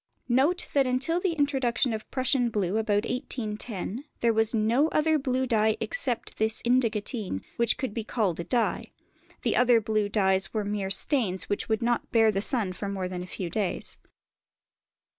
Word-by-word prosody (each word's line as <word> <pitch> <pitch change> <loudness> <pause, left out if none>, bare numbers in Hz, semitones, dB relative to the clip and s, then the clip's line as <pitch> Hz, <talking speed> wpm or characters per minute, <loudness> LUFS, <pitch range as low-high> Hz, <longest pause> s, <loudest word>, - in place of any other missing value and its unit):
Note 280 +9 +2
that 275 -2 +3
until 275 +7 +1
the 360 -2 0
introduction 270 -5 +1
of 215 -1 -6
Prussian 260 -2 +1
blue 205 -2 -1
about 210 -2 +1
1810 225 -1 -4 0.2
there 235 -1 +3
was 220 0 +2
no 230 +6 +2
other 315 0 +2
blue 260 -1 0
dye 220 -3 +2
except 270 -8 -3
this 220 +1 +1
indigotine 225 - 0 0.2
that 235 -1 +2
could 260 -6 -3
be 230 - -3
called 210 -7 -1
a - - -2
dye; 235 +4 -1 0.5
the - - +1
other 245 -1 +5
blue 215 -1 0
dyes 190 -1 +2
were 210 -2 0
mere 200 -1 -2
stains 195 - +1
which 205 - -2
would 220 +1 0
not 240 0 0
bear 225 -2 +4
the 195 -1 -1
sun 215 -5 +2
for 200 +2 -5
more 190 -2 -3
than 180 -1 -5
a 180 - -7
few 180 0 -5
days. 190 +2 -3
225 Hz, 175 wpm, -27 LUFS, 205-255 Hz, 0.5 s, other